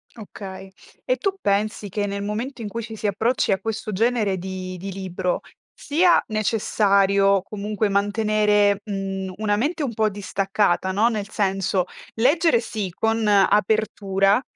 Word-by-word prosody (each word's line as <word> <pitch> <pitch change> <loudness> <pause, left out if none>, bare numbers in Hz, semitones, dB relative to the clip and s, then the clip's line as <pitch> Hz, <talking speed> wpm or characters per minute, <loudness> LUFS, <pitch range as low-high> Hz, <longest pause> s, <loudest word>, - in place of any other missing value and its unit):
Okay. 195 -3 -9 0.4
E - - +2
tu 395 -4 -2
pensi 205 - 0
che, 205 +2 -2
nel 200 0 -3
momento 230 +5 -4
in 215 - -4
cui 230 +2 -5
ci 220 0 -8
si 210 - -2
approcci 220 +2 +1
a 190 - -1
questo 220 -1 -4
genere 220 -1 +1
di 185 0 -6
di 195 +2 -6
libro, 185 -1 -2 0.3
sia 345 +4 +3
necessario 200 -2 +2
comunque 210 +1 -2
mantenere, 205 0 +2
mhmm, 195 -2 -4
una 210 -1 +1
mente 295 +8 -1
un 245 - -2
po' 215 0 +1
distaccata, 195 -1 0
no, 210 +5 +3
nel 215 -3 -2
senso, 195 -3 0 0.3
leggere 285 +3 +3
sì 215 -5 -4
con 225 +3 0
apertura, 205 0 +3
205 Hz, 145 wpm, -23 LUFS, 195-220 Hz, 0.4 s, sia